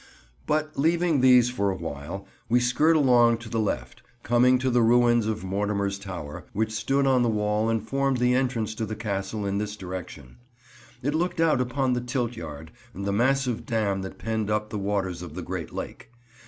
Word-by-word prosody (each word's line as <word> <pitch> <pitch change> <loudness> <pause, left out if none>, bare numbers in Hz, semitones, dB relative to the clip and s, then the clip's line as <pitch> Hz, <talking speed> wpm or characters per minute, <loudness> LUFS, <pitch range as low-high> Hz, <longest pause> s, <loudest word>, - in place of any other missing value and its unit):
But, 155 0 -1
leaving 165 -1 +2
these 125 -1 +6
for 100 -5 0
a 95 - -1
while, 85 +3 -6 0.2
we 120 +2 +4
skirt 125 +7 +3
along 120 -5 +5
to 115 -1 -10
the 115 - -1
left, 80 - -3 0.2
coming 125 +2 +4
to 130 +1 0
the 120 0 +3
ruins 120 -1 +4
of 110 -2 -2
Mortimer's 100 +1 -1
Tower, 90 -7 -7
which 110 +1 0
stood 135 +6 0
on 130 -2 +3
the 120 - +2
wall 105 0 0
and 110 -1 -1
formed 135 -1 +1
the 125 0 +2
entrance 125 -4 0
to 110 0 -4
the 110 - -4
Castle 100 -1 -3
in 100 0 -1
this 105 0 -3
direction. 90 -9 -8 0.7
It 145 +3 0
looked 170 +2 -1
out 160 -6 +3
upon 130 +1 0
the 125 - -1
Tilt 125 -1 -2
Yard 80 -3 -8 0.2
and 100 +2 -5
the 100 - 0
massive 125 +2 +1
dam 105 -5 0
that 95 - -7
penned 110 0 -2
up 105 0 -1
the 105 - -3
waters 95 -3 -2
of 85 -3 -8
the 90 - -5
Great 90 -2 -5
Lake. - - -7
110 Hz, 195 wpm, -26 LUFS, 100-125 Hz, 0.7 s, these